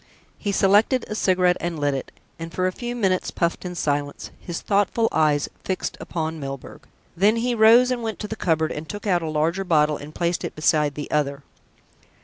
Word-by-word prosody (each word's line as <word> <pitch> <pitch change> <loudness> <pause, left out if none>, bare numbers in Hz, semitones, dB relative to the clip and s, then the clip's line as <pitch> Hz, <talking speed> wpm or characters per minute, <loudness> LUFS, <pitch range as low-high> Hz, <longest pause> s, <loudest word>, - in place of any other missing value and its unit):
He 205 - -1
selected 205 +6 +3
a - - -4
cigarette 180 -3 +2
and 170 -1 -3
lit 145 -1 +1
it, 135 - -5 0.3
and 165 0 -6
for 185 +2 -1
a 185 - +1
few 240 +5 -5
minutes 190 -6 0
puffed 170 -1 -1
in 180 0 -5
silence, 145 -3 -2
his 175 -2 -5
thoughtful 205 +3 +1
eyes 150 -2 +2 0.2
fixed 185 - -3
upon 160 -2 -4
Milburgh. 135 -2 -8 0.3
Then 205 +5 +4
he 240 +2 0
rose 235 +3 +6
and 245 -1 -1
went 225 -1 -3
to 210 - -5
the 220 - -5
cupboard 160 -5 0
and 155 +1 -6
took 205 0 -6
out 180 -4 +2
a 160 - -3
larger 160 +5 0
bottle 150 -4 +2
and 150 +2 -11
placed 170 0 -1
it - - -5
beside 150 -2 +2
the 145 - -6
other. 140 -2 0
175 Hz, 200 wpm, -23 LUFS, 155-205 Hz, 0.3 s, rose